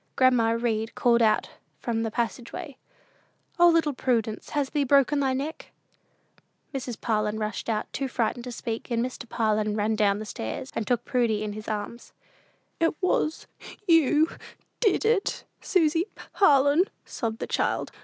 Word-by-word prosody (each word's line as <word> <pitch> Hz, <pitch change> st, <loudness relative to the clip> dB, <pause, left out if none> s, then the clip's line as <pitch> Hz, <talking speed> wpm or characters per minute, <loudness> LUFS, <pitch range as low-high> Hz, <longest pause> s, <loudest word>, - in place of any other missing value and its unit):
Grandma 235 Hz, -3 st, +4 dB
Read 225 Hz, -1 st, -1 dB
called 235 Hz, -1 st, +3 dB
out 220 Hz, -1 st, +2 dB, 0.3 s
from 230 Hz, -2 st, -2 dB
the 225 Hz, -, -1 dB
passage 235 Hz, +2 st, -3 dB
way, 285 Hz, -, -7 dB, 0.8 s
"O, 345 Hz, -, +8 dB
little 325 Hz, -3 st, +3 dB
Prudence, 230 Hz, -4 st, -1 dB
has 285 Hz, -2 st, -1 dB
thee 295 Hz, -2 st, +1 dB
broken 280 Hz, +1 st, +4 dB
thy 270 Hz, -2 st, +1 dB
neck?" 280 Hz, +5 st, -4 dB, 1.0 s
Mrs. 250 Hz, -4 st, -4 dB
Parlin 215 Hz, -2 st, 0 dB
rushed 215 Hz, +1 st, -3 dB
out, 215 Hz, -1 st, 0 dB
too 275 Hz, -, -2 dB
frightened 240 Hz, -1 st, -1 dB
to 250 Hz, -, -5 dB
speak, 230 Hz, -1 st, -5 dB
and 235 Hz, 0 st, +1 dB
Mr. 250 Hz, -2 st, -7 dB
Parlin 215 Hz, -1 st, 0 dB
ran 215 Hz, +1 st, +1 dB
down 210 Hz, 0 st, +1 dB
stairs, 205 Hz, -, -5 dB
and 220 Hz, -, -2 dB
took 245 Hz, -3 st, 0 dB
Prudy 230 Hz, -4 st, +1 dB
up 210 Hz, -, -3 dB
in -, -, -5 dB
his 215 Hz, 0 st, -8 dB
arms. 215 Hz, +2 st, -5 dB, 0.7 s
"It 330 Hz, -2 st, +1 dB
was 330 Hz, -4 st, 0 dB, 0.4 s
you 315 Hz, -2 st, +5 dB, 0.5 s
did 430 Hz, -2 st, +2 dB
it 440 Hz, -3 st, +1 dB, 0.2 s
Susy 330 Hz, -2 st, +2 dB, 0.3 s
Parlin," 290 Hz, -1 st, +5 dB, 0.2 s
sobbed 225 Hz, -2 st, -3 dB
the -, -, -4 dB
child. -, -, -1 dB
240 Hz, 155 wpm, -26 LUFS, 220-285 Hz, 1.0 s, O